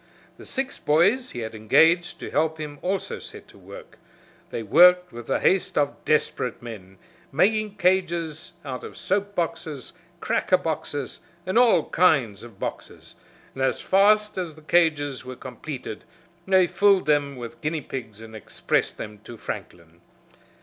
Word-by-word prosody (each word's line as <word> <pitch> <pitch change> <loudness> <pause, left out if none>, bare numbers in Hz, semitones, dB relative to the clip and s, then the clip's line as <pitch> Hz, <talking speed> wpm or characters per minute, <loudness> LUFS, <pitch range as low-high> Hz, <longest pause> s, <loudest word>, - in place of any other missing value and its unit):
The - - -11
six 270 0 -3
boys 200 - +3
he 120 - -5
had 110 0 -5
engaged 160 +11 +3
to - - -6
help 160 0 +1
him 150 -2 -7
also 190 +1 -2
set - - -9
to - - -17
work. - - -13 0.5
They 115 - -4
worked 180 - +6
with 120 -1 -9
the 135 - +1
haste 185 -1 +1
of 145 -1 0
desperate 150 -5 0
men, 100 -5 -10 0.3
making 210 +7 +2
cages 170 -5 0
out 130 -2 -5
of - - -9
soap 200 +1 -1
boxes, 160 - -3 0.3
cracker - - +2
boxes, - - -4 0.3
and 185 - -3
all 230 -10 +5
kinds 135 - +2
of 115 -4 -13
boxes, - - -7 0.4
and 135 - -6
as 135 - +1
fast 210 +1 +3
as 170 -4 -4
the 155 - -16
cages 150 -5 +1
were 130 0 -8
completed 130 +2 -7 0.4
they 190 -1 +5
filled 200 0 +3
them 145 -2 +1
with 120 -2 -9
guinea 155 +1 -2
pigs 110 -6 -7
and 110 0 -11
expressed 110 - -1
them 105 -1 -8
to 120 - -10
Franklin. 85 -4 -8
155 Hz, 155 wpm, -24 LUFS, 125-185 Hz, 0.5 s, worked